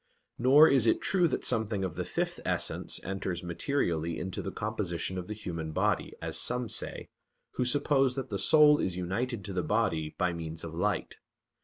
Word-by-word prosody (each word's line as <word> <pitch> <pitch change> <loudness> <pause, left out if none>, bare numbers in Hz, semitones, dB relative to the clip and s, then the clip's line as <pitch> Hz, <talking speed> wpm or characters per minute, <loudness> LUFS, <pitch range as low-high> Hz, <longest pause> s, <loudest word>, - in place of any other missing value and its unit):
Nor 140 +6 +7
is 130 -6 +4
it - - +3
true 180 -3 +3
that - - -2
something 110 -3 +1
of 90 -3 -3
the - - -3
fifth - - -3
essence - - -1
enters 95 -2 -4
materially 85 - -1
into 95 0 -4
the - - -5
composition 95 - -3
of 90 - -7
the 105 - -5
human 85 -6 -5
body, - - 0
as - - -2
some 125 -2 0
say, - - -3 0.4
who 125 - -1
suppose 135 0 +2
that 135 -1 -4
the 100 -2 -3
soul 150 +6 +6
is 90 -1 -2
united 100 +4 -3
to 100 - -5
the 90 - 0
body 85 -5 -1
by 90 -2 0
means 80 -1 -5
of 80 -1 -7
light. 95 +3 -2
100 Hz, 185 wpm, -29 LUFS, 85-125 Hz, 0.4 s, Nor